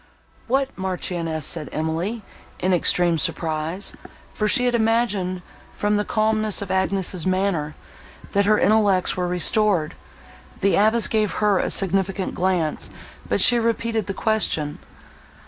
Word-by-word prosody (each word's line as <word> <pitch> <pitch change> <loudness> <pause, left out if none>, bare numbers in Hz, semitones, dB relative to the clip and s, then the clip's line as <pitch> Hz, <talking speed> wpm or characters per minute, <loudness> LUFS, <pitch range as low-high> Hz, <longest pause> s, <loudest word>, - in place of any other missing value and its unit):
"What 270 +2 0
Marchioness?" 175 -4 -3
said 150 -2 -3
Emily, 165 +8 -3 0.3
in 185 0 0
extreme 175 -1 +3
surprise; 165 +1 -1 0.4
for 215 - -1
she 250 +3 +4
had 245 - +1
imagined, 220 -6 0 0.3
from 210 0 0
the 210 - 0
calmness 215 -1 +1
of 200 -2 -4
Agnes's 190 -2 -1
manner, 185 -5 -1 0.6
that 200 0 +2
her 215 0 +4
intellects 205 -3 +2
were 180 -1 -2
restored. 180 -2 +1 0.7
The 195 - +2
abbess 220 +3 +4
gave 215 -2 0
her 205 -3 +1
a - - -1
significant 195 0 0
glance, 180 -4 -1 0.4
but - - +1
she 240 -1 +5
repeated 230 -2 -1
the 195 - -4
question. 175 -9 -1
195 Hz, 130 wpm, -22 LUFS, 175-215 Hz, 0.7 s, she